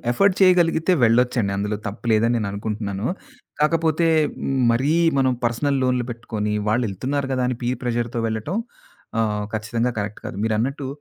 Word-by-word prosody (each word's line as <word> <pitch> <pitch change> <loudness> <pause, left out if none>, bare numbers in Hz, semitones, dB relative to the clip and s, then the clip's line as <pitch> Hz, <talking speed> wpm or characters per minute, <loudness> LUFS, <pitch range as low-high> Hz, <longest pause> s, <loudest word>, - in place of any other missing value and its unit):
Afford 195 +9 +3
చేయగలిగితే 175 -2 +4
వెళ్ళొచ్చండి. 120 -3 +3
అందులో 105 +1 -1
తప్పు 105 +4 -6
లేదని 115 +2 +3
నేను 110 -3 -1
అనుకుంటున్నాను. 105 0 -3 0.5
కాకపోతే 165 +1 +2 0.3
హ్మ్. 135 - -2 0.2
మరీ 130 +6 +2 0.3
మనం 130 -1 +3
పర్సనల్ 135 +4 +1
లోనులు 125 -1 +1
పెట్టుకొని, 110 -3 -3 0.2
వాళ్ళేళ్తున్నారు 125 +5 -1
కదా! 130 -1 0
అని 125 - -2
పీర్ 125 +1 -1
ప్రెషర్‌తో 120 -1 -1
వెళ్ళటం 110 - -3 0.6
ఆహ్, 105 -2 0
ఖచ్చితంగా 115 +3 -1
కరెక్ట్ 105 +1 -4
కాదు. - - -6
మీరన్నట్టు 125 +6 -1
120 Hz, 140 wpm, -22 LUFS, 110-135 Hz, 0.6 s, చేయగలిగితే